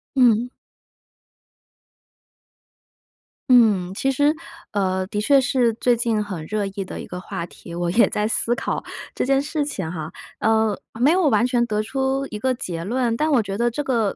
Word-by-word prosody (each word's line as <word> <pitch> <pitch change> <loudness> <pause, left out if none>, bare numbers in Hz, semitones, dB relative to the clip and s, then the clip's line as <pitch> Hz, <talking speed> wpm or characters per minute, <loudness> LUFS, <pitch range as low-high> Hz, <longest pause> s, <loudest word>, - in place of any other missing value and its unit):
嗯。 245 -2 +4 3.0
嗯， 210 -7 +5
其 270 +7 0
实， 290 +3 +3 0.4
呃， 190 -2 0
的 205 +1 -3
确 275 +5 +4
是 245 -2 +2
最 240 +2 +2
近 225 -3 0
很 185 -6 -6
热 210 +3 -2
议 195 0 -5
的 - - -7
一 - - -9
个 180 - -6
话 170 -2 -5
题， 170 0 -11
我 175 0 -1
也 225 +6 +5
在 210 0 0
思 230 +2 0
考 - - -3 0.3
这 - - -1
件 270 +1 +3
事 295 +1 -2
情 190 - -4
哈。 160 -2 -5 0.3
呃， 220 -2 +2 0.2
没 270 +5 +5
有 360 -2 +3
完 245 - +3
全 245 -1 +2
得 215 -2 -1
出 265 +4 -1
一 210 - -6
个 260 +4 +1
结 175 -9 -5
论， 235 +3 0
但 310 +4 +1
我 260 -5 +4
觉 195 -1 -4
得 240 +1 +2
这 290 +6 -3
个， 230 -7 0
225 Hz, 190 characters per minute, -22 LUFS, 195-260 Hz, 3.0 s, 嗯